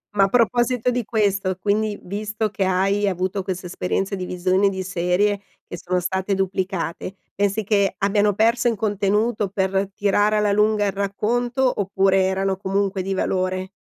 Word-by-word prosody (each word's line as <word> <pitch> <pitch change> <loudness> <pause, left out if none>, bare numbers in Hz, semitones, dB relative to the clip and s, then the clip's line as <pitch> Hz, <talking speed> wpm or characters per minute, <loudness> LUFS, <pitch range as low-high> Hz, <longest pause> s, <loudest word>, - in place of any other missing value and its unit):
Ma 200 - +5
a - - +4
proposito 240 +1 +2
di 245 0 -1
questo, 200 -4 0
quindi, 210 +1 0
visto 210 +3 -3
che 195 0 -2
hai 195 +2 +1
avuto 190 0 -1
queste 185 0 -4
esperienze 190 +2 -2
di 185 - -5
visione 185 +2 +1
di 190 -1 -4
serie 185 +3 0 0.3
che 175 - -7
sono 180 +2 -1
state 190 +2 -1
duplicate, 190 -1 -3 0.2
pensi 205 +1 0
che 200 -2 +1
abbiano 205 +1 +2
perso 230 +4 +2
in 230 - -2
contenuto 210 +1 0
per 195 0 0
tirare 205 +1 +2
alla 210 -1 +2
lunga 210 0 +2
il 200 - -1
racconto 240 +6 0
oppure 195 0 +2
erano 190 0 0
comunque 195 0 -1
di 195 +1 -2
valore? 185 0 -1
195 Hz, 160 wpm, -22 LUFS, 190-210 Hz, 0.3 s, Ma